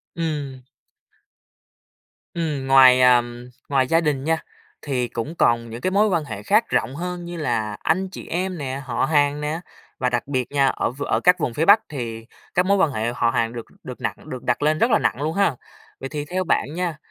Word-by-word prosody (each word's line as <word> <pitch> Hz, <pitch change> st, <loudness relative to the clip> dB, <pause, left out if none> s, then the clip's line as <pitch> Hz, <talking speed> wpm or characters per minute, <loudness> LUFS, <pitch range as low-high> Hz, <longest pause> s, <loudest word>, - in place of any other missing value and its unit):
Ừm. 145 Hz, -6 st, -3 dB, 1.7 s
Ừm, 150 Hz, -5 st, -3 dB
ngoài, 130 Hz, -1 st, +7 dB
à, 125 Hz, -1 st, +6 dB, 0.5 s
ngoài 135 Hz, -2 st, +2 dB
gia 165 Hz, +4 st, +3 dB
đình 145 Hz, -4 st, -1 dB
nha, 160 Hz, +2 st, +1 dB, 0.4 s
thì 130 Hz, -4 st, -1 dB
cũng 120 Hz, +8 st, -5 dB
còn 115 Hz, -5 st, +2 dB
những 115 Hz, +2 st, -8 dB
cái 185 Hz, -, 0 dB
mối 205 Hz, +3 st, +3 dB
quan 175 Hz, -6 st, 0 dB
hệ -, -, -7 dB
khác 215 Hz, +3 st, +2 dB
rộng 125 Hz, +4 st, 0 dB
hơn 175 Hz, +2 st, -5 dB
như 175 Hz, 0 st, -6 dB
là 110 Hz, -8 st, -2 dB
anh 185 Hz, +4 st, 0 dB
chị -, -, -9 dB
em 185 Hz, +1 st, -2 dB
nè, 135 Hz, -2 st, -4 dB
họ 120 Hz, -3 st, 0 dB
hàng 145 Hz, -1 st, +2 dB
nè, 150 Hz, +2 st, -2 dB, 0.4 s
và 125 Hz, -, +1 dB
đặc 125 Hz, -, -2 dB
biệt 130 Hz, -3 st, -2 dB
nha, 140 Hz, -1 st, +3 dB
ở -, -, -1 dB
v 140 Hz, +3 st, -6 dB
ở -, -, 0 dB
các 180 Hz, 0 st, +4 dB
vùng 125 Hz, -, -1 dB
phía 155 Hz, +7 st, 0 dB
Bắc 205 Hz, +4 st, +7 dB
thì 115 Hz, -6 st, -5 dB, 0.3 s
các 180 Hz, -, +2 dB
mối 200 Hz, +1 st, +3 dB
quan 165 Hz, -6 st, +3 dB
hệ 110 Hz, -1 st, -2 dB
họ 115 Hz, -, +1 dB
hàng 115 Hz, -2 st, 0 dB
được 115 Hz, -2 st, -6 dB, 0.2 s
được -, -, -9 dB
nặng -, -, -5 dB
được 130 Hz, -, -6 dB
đặt 125 Hz, -, 0 dB
lên 155 Hz, +1 st, +2 dB
rất 235 Hz, -, +3 dB
là -, -, +4 dB
nặng 115 Hz, +7 st, 0 dB
luôn 155 Hz, +2 st, -1 dB
ha! 200 Hz, -8 st, +2 dB, 0.4 s
Vậy 135 Hz, -, -6 dB
thì 145 Hz, 0 st, -4 dB
theo 185 Hz, +4 st, -2 dB
bạn 150 Hz, -4 st, 0 dB
nha, 175 Hz, -3 st, -2 dB
145 Hz, 220 wpm, -22 LUFS, 125-170 Hz, 1.7 s, ngoài